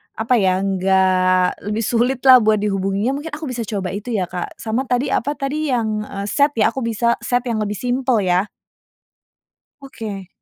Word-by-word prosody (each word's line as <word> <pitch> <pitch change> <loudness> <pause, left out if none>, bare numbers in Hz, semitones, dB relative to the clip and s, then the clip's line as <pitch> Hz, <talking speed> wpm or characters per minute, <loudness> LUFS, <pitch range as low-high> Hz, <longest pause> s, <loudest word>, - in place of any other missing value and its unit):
apa 225 +3 0
ya, 185 -2 +2
enggak 185 -1 +2
lebih 210 +2 -2
sulitlah 255 +3 +4
buat 215 0 +3
dihubunginya. 200 +4 -1
Mungkin 295 +2 -6
aku 310 0 -6
bisa 245 -2 -3
coba 200 -3 -3
itu 215 +4 -6
ya, 190 -5 -1
Kak. 180 0 -6
Sama 230 +3 -1
tadi 250 +1 0
apa 280 +5 0
tadi 290 +2 -2
yang, 220 -3 -1
eee, 200 -1 -6
set 285 +6 +2
ya - - +5
aku 265 +2 -4
bisa 230 +1 +1
set 245 +2 0
yang 230 -2 -1
lebih 205 -1 -4
simpel 250 -1 0
ya? 180 +1 +2 1.4
Oke. 215 -8 -7
220 Hz, 175 wpm, -20 LUFS, 195-255 Hz, 1.4 s, ya